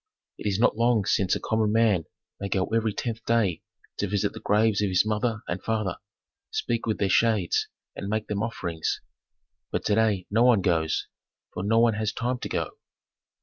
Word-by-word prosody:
It - - -3
is 100 -2 +1
not 110 - +3
long 115 -2 +2
since 95 -1 +2
a - - -2
common 110 -1 0
man 110 -7 +3 0.3
might 100 0 -2
go 95 -2 +1
every 115 -1 +2
tenth 115 +2 -4
day 110 -8 +1 0.4
to 100 - -1
visit 100 +1 0
the - - -8
graves 105 0 +2
of 105 - +1
his 90 +2 +3
mother 110 +1 -1
and 90 +2 -3
father, 110 -5 -1 0.5
speak 115 -1 -2
with 110 - 0
their 100 - +1
shades, 105 -2 +2 0.3
and 100 - -5
make 110 0 -1
them 105 -1 -2
offerings. 85 -8 -2 0.7
But - - -2
to - - +2
day 105 -4 +2
no 110 +3 +3
one 120 -4 +5
goes, 80 -4 +1 0.5
for - - -4
no 110 +3 +2
one 115 0 +5
has 105 0 -1
time 125 +1 -2
to - - -5
go. - - -3
105 Hz, 190 wpm, -26 LUFS, 100-115 Hz, 0.7 s, one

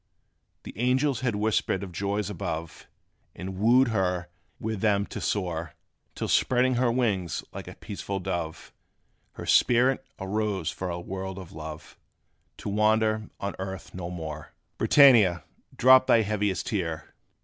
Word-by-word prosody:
The - - -9
angels 130 +1 +2
had 125 -4 -1
whispered 105 -2 0
of 95 - -7
joys 100 +4 -2
above, 80 -3 -5 0.5
And 95 0 -6
wooed 120 +4 +5
her 90 -5 -1 0.3
with 110 -3 -3
them 100 -2 +2
to - - -7
soar, 85 -5 -2 0.4
Till - - -3
spreading 130 0 +3
her 120 -1 +2
wings 105 -8 0
like - - -7
a - - -9
peaceful 100 -1 -5
dove, 85 -3 -4 0.6
Her - - -8
spirit 125 +2 +4 0.2
arose 95 -3 -1
for 95 - -5
a 85 0 -3
world 95 +1 -5
of 95 -4 -9
love 80 -1 -9 0.6
To - - -5
wander 110 +1 +2
on 100 0 -4
earth 95 0 -6
no 90 -1 -5
more. 80 -3 -7 0.3
BRITANNIA, 115 -12 +6 0.3
drop 130 +1 +7
thy 115 - +5
heaviest 105 -2 -1
tear! 85 -8 -3
100 Hz, 140 wpm, -27 LUFS, 90-110 Hz, 0.6 s, drop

